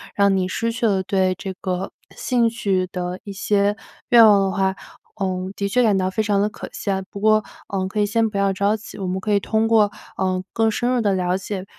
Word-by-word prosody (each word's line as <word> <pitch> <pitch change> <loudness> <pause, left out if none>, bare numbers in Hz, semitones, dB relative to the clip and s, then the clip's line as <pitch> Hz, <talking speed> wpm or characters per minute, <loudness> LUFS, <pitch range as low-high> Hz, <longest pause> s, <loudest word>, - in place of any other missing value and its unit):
让 200 -1 +3
你 185 -1 0
失 230 +5 -2
去 230 0 0
了 190 -2 +1
对 185 -1 +1
这 190 -1 -5
个 185 0 -3 0.2
兴 240 -3 +1
趣 195 -5 -1
的 180 0 -4
一 200 - -7
些 205 +1 +1 0.3
愿 235 -2 +8
望 205 -2 +6
的 195 -1 0
话， 190 -1 0 0.5
嗯， 185 0 -2
的 200 0 -2
确 250 +4 +2
感 210 -4 +3
到 185 0 0
非 220 +3 -1
常 205 -2 +1
的 210 - +1
可 - - -9
惜 200 - -3
啊。 190 0 -1
不 200 - -8
过 215 0 +4 0.5
可 210 - -3
以 - - +3
先 225 +2 +1
不 200 - -5
要 200 0 +2
着 200 +2 +1
急， 215 - -10
我 190 -2 -4
们 185 +1 -2
可 210 - -2
以 200 - +4
通 220 +2 0
过， 215 -2 +4 0.3
呃， 185 -1 -1
更 225 -1 +2
深 240 +3 -1
入 250 -1 +1
的 205 -3 +1
了 180 0 0
解， 195 -1 -5
200 Hz, 255 characters per minute, -21 LUFS, 190-215 Hz, 0.5 s, 愿